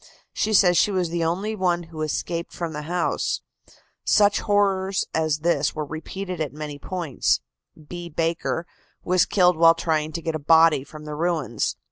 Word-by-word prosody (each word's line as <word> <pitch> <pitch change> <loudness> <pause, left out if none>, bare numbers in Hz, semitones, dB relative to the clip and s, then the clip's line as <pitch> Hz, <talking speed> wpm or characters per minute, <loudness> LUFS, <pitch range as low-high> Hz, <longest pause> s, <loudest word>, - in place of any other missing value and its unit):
She 215 - 0
says 180 -4 +5
she - - +3
was 185 -4 -1
the 170 -1 -1
only 190 +7 -1
one 175 -3 0
who 160 -1 -9
escaped 165 +2 -3
from 170 -2 -5
the 150 - -4
house. 175 -1 -1 0.6
Such 205 -1 +4
horrors 195 -2 +1
as 155 -1 0
this 170 +2 +1
were 155 -1 -3
repeated 180 +3 -6
at 150 - -2
many 150 -1 -7
points. 170 -7 -1 0.5
B. 175 +1 -7
Baker 165 +1 -1 0.4
was 180 0 +3
killed 180 -4 +3
while 165 0 +6
trying 155 -2 -1
to 170 - -4
get 165 - -2
a 155 - -3
body 160 -1 +5
from 150 +2 -12
the 150 - -6
ruins. 155 -7 -1
170 Hz, 170 wpm, -24 LUFS, 155-180 Hz, 0.6 s, while